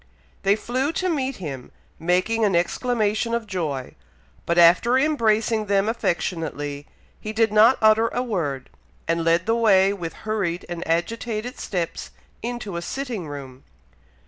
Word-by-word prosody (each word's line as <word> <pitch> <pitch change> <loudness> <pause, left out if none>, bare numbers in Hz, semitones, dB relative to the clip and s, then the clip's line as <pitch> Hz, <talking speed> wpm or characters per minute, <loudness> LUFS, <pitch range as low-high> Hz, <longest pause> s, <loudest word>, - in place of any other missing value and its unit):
They 200 +1 +3
flew 255 +6 -1
to 370 +2 -1
meet 270 -5 -1
him, 140 - -7 0.3
making 185 +7 +1
an 200 -4 +2
exclamation 220 +4 0
of 235 -1 -3
joy; 160 -10 -3 0.5
but 170 - +1
after 175 +9 +6
embracing 225 -6 +1
them 200 0 +2
affectionately, 165 -9 -2 0.3
he 215 - -5
did 220 -1 +1
not 220 +4 +6
utter 220 +1 +5
a 245 +2 -2
word, 155 - -3 0.4
and 165 0 0
led 165 +1 +2
the 225 - +2
way 200 -4 +4
with 170 -5 -5
hurried 195 -6 -2
and 175 0 -5
agitated 225 - -2
steps 175 -5 -3 0.3
into 230 -6 -4
a - - -3
sitting 230 - -4
room. 135 -3 -9
205 Hz, 145 wpm, -23 LUFS, 170-230 Hz, 0.5 s, after